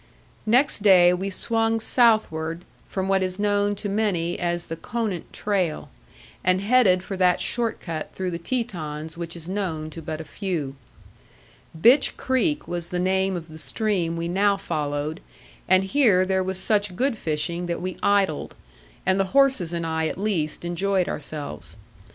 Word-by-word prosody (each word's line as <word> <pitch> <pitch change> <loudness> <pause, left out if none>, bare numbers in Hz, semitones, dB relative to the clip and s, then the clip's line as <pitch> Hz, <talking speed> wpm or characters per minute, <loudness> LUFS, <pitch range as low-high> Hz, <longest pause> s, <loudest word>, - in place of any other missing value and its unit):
Next 250 +1 +3
day 180 -3 +6
we 190 +2 -2
swung 225 +3 +1
southward 180 -9 +2 0.2
from 190 -1 -2
what 195 0 +2
is 185 0 -2
known 205 0 +1
to 205 - -5
many 195 -5 0
as 175 -1 -1
the 165 - -5
Conant 205 0 -4
trail, 185 -7 -2 0.5
and 185 0 +3
headed 200 -4 +4
for 195 - -5
that 180 -1 +3
short 235 -2 -1
cut 160 -3 -5
through 185 -1 -3
the 170 - -4
Tetons 165 -8 -4
which 170 0 -6
is 165 -1 -10
known 175 -5 -3
to 165 - -8
but 155 0 -5
a - - -5
few. 160 -5 -4 1.0
Bitch 245 - +5
Creek 295 +4 0
was 170 -1 -4
the 180 - -2
name 190 +1 +1
of 165 -2 -6
the 155 -1 -9
stream 180 -5 0
we 165 0 -2
now 200 +3 +2
followed, 150 -1 -3 0.5
and 185 +1 +5
here 195 -4 +3
there 190 0 +1
was 190 0 -3
such 205 -1 0
good 260 +4 +1
fishing 170 0 -2
that 170 - -2
we 185 0 -4
idled; 200 -1 +1 0.5
and 190 +1 +3
the 195 +7 0
horses 265 -12 +4
and 170 -1 -2
I 160 0 0
at - - -4
least 180 -6 -2
enjoyed 185 +2 0
ourselves. 150 0 -6
185 Hz, 165 wpm, -24 LUFS, 170-205 Hz, 1.0 s, day